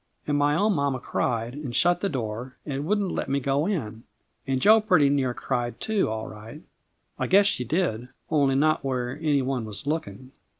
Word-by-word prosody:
And 145 - 0
my 145 +1 +2
own 205 +5 +2
mamma 140 -4 0
cried, 120 -1 -2
and 140 -4 -6
shut 175 0 +3
the 200 - 0
door, 125 - -5
and 140 -1 -3
wouldn't 205 -2 +1
let - - -3
me 140 +1 +1
go 140 +4 0
in. 115 - -3 0.5
And 135 -1 0
Jo 215 +8 +6
pretty 180 -10 +4
near 135 -3 +1
cried 120 -3 -3
too, 215 - 0
all 110 0 -4
right. 110 +9 -11 0.6
I - - 0
guess 200 +2 +5
she 160 -10 +1
did, 125 -5 -1 0.2
only 140 -4 +3
not 155 +2 +2
when 130 0 -2
any 145 -4 +1
one 130 -2 -2
was 105 0 -8
looking. 130 -5 -4
140 Hz, 195 wpm, -26 LUFS, 125-160 Hz, 0.6 s, Jo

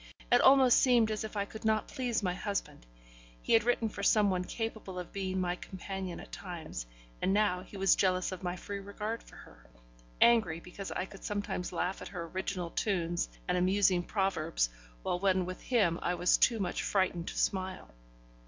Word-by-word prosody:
It - - +6
almost 265 -2 +7
seemed 240 -4 +4
as 215 0 -2
if 215 -1 -6
I 200 - 0
could 220 +2 -10
not 220 -1 +1
please 245 -4 -2
my 180 -2 +1
husband. 195 - -4 0.5
He - - 0
had 225 -1 +6
written 235 -1 +1
for 205 - -6
some 205 0 +4
one 180 -1 0
capable 220 -2 -5
of 180 -1 -6
being 190 -1 -2
my 180 -1 0
companion 190 -1 -6
at - - -11
times, - - -6 0.3
and 190 - +2
now 205 -4 +2
he 200 - -11
was 195 0 +4
jealous 185 -1 +1
of 185 - -6
my 180 -1 -2
free 200 +2 -6
regard 210 +3 -4
for - - -16
her - - -15 0.5
angry 220 -9 +4
because 180 +3 -8
I - - -2
could 195 0 -13
sometimes 205 -3 -3
laugh 180 +2 -2
at - - -6
her 180 -3 -5
original 185 0 -3
tunes 175 -4 -1 0.2
and 180 0 +1
amusing 185 0 +3
proverbs, 175 - 0 0.3
while 175 - -1
when 185 -1 +2
with 185 +1 -6
him 195 -9 +2
I 175 - 0
was 180 +1 +4
too 230 -3 +3
much 180 -3 -1
frightened 185 -3 0
to - - -5
smile. 190 - -1
190 Hz, 190 wpm, -31 LUFS, 180-210 Hz, 0.5 s, almost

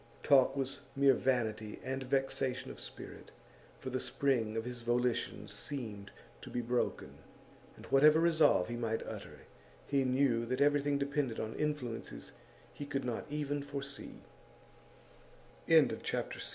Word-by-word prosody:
Talk 135 0 +5
was 135 +1 -2 0.2
mere 135 -1 +6
vanity 115 -5 -1
and 135 +1 -3
vexation 135 -1 -1
of - - -11
spirit, - - -9 0.5
for 130 - -6
the 130 - -1
spring 125 -4 0
of 115 - -2
his 125 -1 -5
volition 120 +1 0
seemed 110 -8 -6 0.3
to - - -9
be 125 - -2
broken, 120 +1 -2 0.6
and, - - -12
whatever 150 +3 +6
resolve 160 - +4
he 120 - -4
might 110 -1 -2
utter, - - -8 0.4
he 140 -1 +2
knew 130 -2 +2
that 130 +2 -1
everything 145 0 +3
depended 140 -4 -1
on 110 0 -3
influences 150 -6 -3 0.4
he 145 - -7
could 135 -2 -2
not 120 -2 -3
130 Hz, 125 wpm, -34 LUFS, 120-140 Hz, 0.6 s, mere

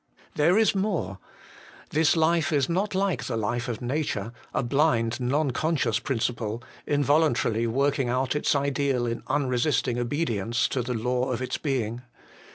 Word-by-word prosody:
There 170 +6 +3
is 220 -2 +4
more. 190 - -1 0.7
This 155 +1 +3
life 160 0 +2
is 140 -4 +2
not 190 +4 -1
like 195 -2 0
the - - -2
life 120 +3 -1
of 120 -1 -4
nature, 120 -5 -2 0.2
a - - -1
blind, 120 -3 +1
non 135 +3 +1
conscious 140 -5 0
principle, 115 -3 -2 0.2
involuntarily 145 -6 +2
working 135 +1 +1
out 130 +3 0
its 150 - +1
ideal 140 -3 0
in 115 0 -3
unresisting 130 -2 +1
obedience 120 -4 0
to 130 - -1
the 125 +1 -3
law 125 +3 0
of 120 - -1
its 130 - -3
being. 125 -5 -2
130 Hz, 150 wpm, -26 LUFS, 120-150 Hz, 0.7 s, is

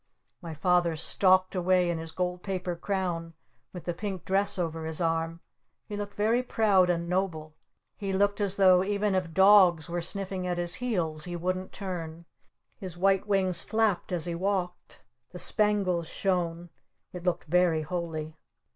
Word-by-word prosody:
My 165 -3 -7
Father 175 +1 +2
stalked 185 +3 +3
away 180 -1 +2
in 170 -1 -1
his 160 0 -5
gold 180 +1 -3
paper 185 -2 -3
crown 170 -3 -3 0.4
with 180 - -8
the 175 - -2
pink 190 -1 -5
dress 195 +1 +1
over 165 -2 -3
his 160 -1 -3
arm. 165 0 -1 0.5
He 210 - -5
looked 205 0 -6
very 225 +4 +2
proud 205 -7 +3
and 170 -1 0
noble. 170 -4 -2 0.4
He 195 -1 -3
looked 200 +2 +1
as 200 -1 0
though 185 -2 +5
even 205 +1 0
if 185 -3 -1
dogs 185 -3 +5
were 175 0 -1
sniffing 190 +1 -4
at 175 -1 -1
his 175 0 +1
heels 170 -11 -1
he 175 -1 -5
wouldn't 185 +2 -3
turn. 170 -4 -6 0.5
His 185 -3 -7
white 195 +2 +2
wings 185 -4 +2
flapped 220 -5 0
as 175 -2 -1
he 175 - -3
walked. 185 0 -3 0.3
The - - -7
spangles 200 -6 +1
shone. 175 -3 -2 0.4
It 180 -1 -7
looked 180 -1 0
very 170 -1 +2
holy. 160 -1 -5
180 Hz, 165 wpm, -28 LUFS, 170-195 Hz, 0.5 s, though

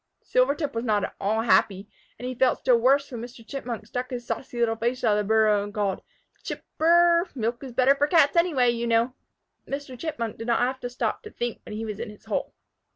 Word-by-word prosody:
Silvertip 280 +3 +1
was 230 0 -2
not 210 -4 +1
at - - -3
all 215 +3 +1
happy, 200 -3 +2 0.3
and 250 - -6
he 255 - -3
felt 255 0 +2
still 245 -2 +3
worse 275 +4 +3
when 240 -3 -5
Mr. 235 -1 -10
Chipmunk 240 -6 -5
stuck 250 +3 -4
his 245 -2 -5
saucy 245 0 -5
little 230 -1 +2
face 240 +3 -2
out 225 - +4
of 210 - +3
the 205 - -2
burrow 215 -2 +3
and 205 - -7
called, 200 -3 -1 0.4
"Chip - - -6 0.2
r 320 - +2
r 345 0 +6
r! 350 +1 -3
Milk 235 +1 -2
is 265 - -7
better 255 +3 +4
for 290 +1 +1
Cats 310 -3 +4
anyway, 305 -8 +3
you 235 0 -2
know!" 230 +2 +2 0.5
Mr. 275 -2 -5
Chipmunk 235 -9 -4
did 225 - -6
not 235 0 +2
have 260 +2 0
to 245 - -5
stop 245 - -2
to 430 - -10
think 240 - -4
when 210 - -7
he 225 +1 -4
was 210 -1 -5
in 235 -1 -5
his 210 +1 -14
hole. 220 - -2
240 Hz, 240 wpm, -25 LUFS, 225-265 Hz, 0.5 s, r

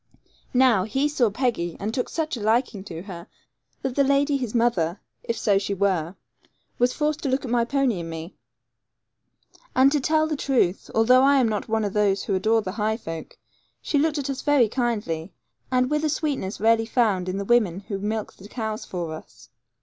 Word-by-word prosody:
Now, 245 -7 +5
he 270 +7 0
saw 260 -6 +2
Peggy, 205 -7 -1
and 210 +3 -3
took 250 - -2
such 315 -3 -2
a 235 - -7
liking 220 -1 +1
to 170 -3 -7
her, 175 -4 -9 0.6
that 265 -2 -1
the 280 - +3
lady 280 +1 +2
his 250 -4 -3
mother 200 -7 +1 0.2
if 230 - -3
so 200 -2 +2
she 200 0 -3
were 185 -3 0 0.6
was 245 +1 +3
forced 300 +2 -1
to 285 - -1
look 265 +1 0
at 240 - -5
my 240 -1 +2
pony 260 -6 +1
and 165 -1 -6
me. 165 +2 -7 1.4
And, 265 +1 +6
to 295 - +2
tell 310 +3 +2
the 315 -1 -2
truth, 250 -10 0
although 245 +3 +5
I 280 +1 +5
am 260 -4 +4
not 215 0 -3
of 220 -3 0
those 200 -2 +2
who 200 - -2
adore 220 +3 +2
the 185 - -4
high 215 +2 -1
folk, 165 -7 -8 0.4
she 290 - 0
looked 310 +1 +1
at 280 -1 -2
us 270 - -5
very 290 -6 +4
kindly, 205 -9 -2 0.4
and 255 +1 +2
with 300 0 +1
a 310 - +2
sweetness 285 -10 -2
rarely 225 +1 +3
found 210 -7 +1
in 185 - -2
the 200 - -3
women 200 -6 +2
who 195 0 -5
milk 215 +1 -3
the 195 - -13
cows 220 -2 -4
for 170 -3 -4
us. 155 - -12
225 Hz, 200 wpm, -24 LUFS, 195-265 Hz, 1.4 s, And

